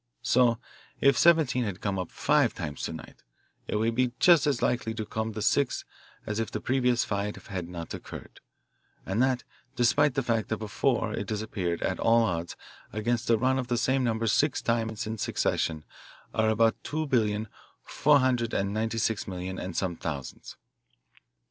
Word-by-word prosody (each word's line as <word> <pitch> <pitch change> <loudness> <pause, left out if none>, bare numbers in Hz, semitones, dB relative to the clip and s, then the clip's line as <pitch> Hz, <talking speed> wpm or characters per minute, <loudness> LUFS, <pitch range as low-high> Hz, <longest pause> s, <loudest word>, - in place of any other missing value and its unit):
So 120 0 +4 0.4
if 140 -1 +5
'17' 155 -4 +4
had 100 -4 -4
come 100 -2 -2
up 90 - -4
five 145 -4 +2
times 75 -5 -5
to - - -4
night, 80 - -11 0.5
it - - -2
would 110 +2 +1
be 125 0 +1
just 170 -5 +6
as 140 -4 +1
likely 115 -2 0
to 110 -1 -3
come 110 +1 -3
the 105 0 -4
sixth 140 +3 +1 0.4
as 105 +1 -2
if 115 - -1
the - - -4
previous 125 -1 +1
five 100 0 -2
had 90 -3 -4
not 85 -2 -6
occurred, - - -9 0.7
and 100 +5 0
that 130 -1 +2 0.3
despite 125 +4 +3
the 135 - +1
fact 115 -2 0
that 110 - -1
before 110 +2 0
it 100 -2 -4
has 110 -1 -2
appeared 90 -6 -2
at - - -1
all 115 +1 +4
odds 85 -5 -2 0.4
against 115 +2 -1
a 115 - +5
run 130 +3 +2
of 125 - -3
the 120 0 0
same 130 +2 +1
number 115 -1 0
six 135 +6 +2
times 110 -2 -1
in 110 0 -4
succession 80 -5 -1 0.5
are 110 0 +2
about 115 +1 +2
two 155 +1 -2
billion, 110 -5 +1 0.4
four 150 +1 +3
hundred 125 -3 +1
and 100 +1 0
ninety 110 +1 -1
six 110 -1 0
million, 95 0 -5
and 90 -2 -5
some 90 -3 -1
thousands. 70 -6 -6
115 Hz, 180 wpm, -28 LUFS, 100-125 Hz, 0.7 s, just